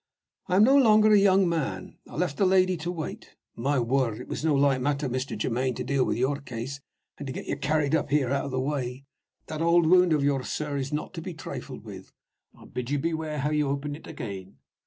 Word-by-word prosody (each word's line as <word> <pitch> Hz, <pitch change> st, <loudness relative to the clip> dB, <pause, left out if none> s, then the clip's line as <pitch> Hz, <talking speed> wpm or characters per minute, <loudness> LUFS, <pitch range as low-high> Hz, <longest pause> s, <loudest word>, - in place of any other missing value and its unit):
I 185 Hz, -, +1 dB
am 200 Hz, -, +6 dB
no 265 Hz, +5 st, +6 dB
longer 215 Hz, -5 st, +6 dB
a 205 Hz, -, +7 dB
young 195 Hz, -1 st, +4 dB
man: 135 Hz, -, -3 dB
I -, -, -10 dB
left 155 Hz, -3 st, -1 dB
the 195 Hz, -, +3 dB
lady 185 Hz, 0 st, +4 dB
to 170 Hz, +1 st, -4 dB
wait. 160 Hz, -4 st, -7 dB, 0.2 s
My 135 Hz, +5 st, 0 dB
word! 120 Hz, -2 st, 0 dB
it -, -, -9 dB
was -, -, -5 dB
no 160 Hz, -2 st, +3 dB
light 140 Hz, -2 st, +3 dB
matter, 140 Hz, +1 st, 0 dB
Mr. 130 Hz, +2 st, -3 dB
Germaine, 125 Hz, +1 st, -1 dB
to -, -, -4 dB
deal 140 Hz, -2 st, +1 dB
with -, -, -1 dB
your 130 Hz, +3 st, +1 dB
case, 130 Hz, 0 st, -6 dB, 0.4 s
and 140 Hz, -2 st, -5 dB
get -, -, -6 dB
you -, -, -2 dB
carried 150 Hz, 0 st, 0 dB
up 160 Hz, -, +1 dB
here 140 Hz, -3 st, +1 dB
out 140 Hz, 0 st, 0 dB
of -, -, -4 dB
the 130 Hz, -1 st, -2 dB
way. 130 Hz, -1 st, -3 dB, 0.4 s
That 155 Hz, 0 st, -5 dB
old 170 Hz, 0 st, +4 dB
wound 180 Hz, +1 st, +5 dB
of 150 Hz, -3 st, +2 dB
yours, 140 Hz, -2 st, 0 dB
sir, 150 Hz, -2 st, -3 dB
is 135 Hz, 0 st, -3 dB
not 150 Hz, 0 st, -3 dB
to 165 Hz, -, -6 dB
be 180 Hz, 0 st, -7 dB
trifled 160 Hz, -, -7 dB
with. -, -, -10 dB, 0.5 s
I -, -, -15 dB
bid 125 Hz, 0 st, -5 dB
you 145 Hz, -, +1 dB
beware 160 Hz, 0 st, -2 dB
how 150 Hz, +2 st, 0 dB
you 150 Hz, -2 st, +1 dB
open 140 Hz, +1 st, -2 dB
it 150 Hz, -, -10 dB
again. 95 Hz, -6 st, -7 dB
145 Hz, 235 wpm, -27 LUFS, 130-165 Hz, 0.5 s, a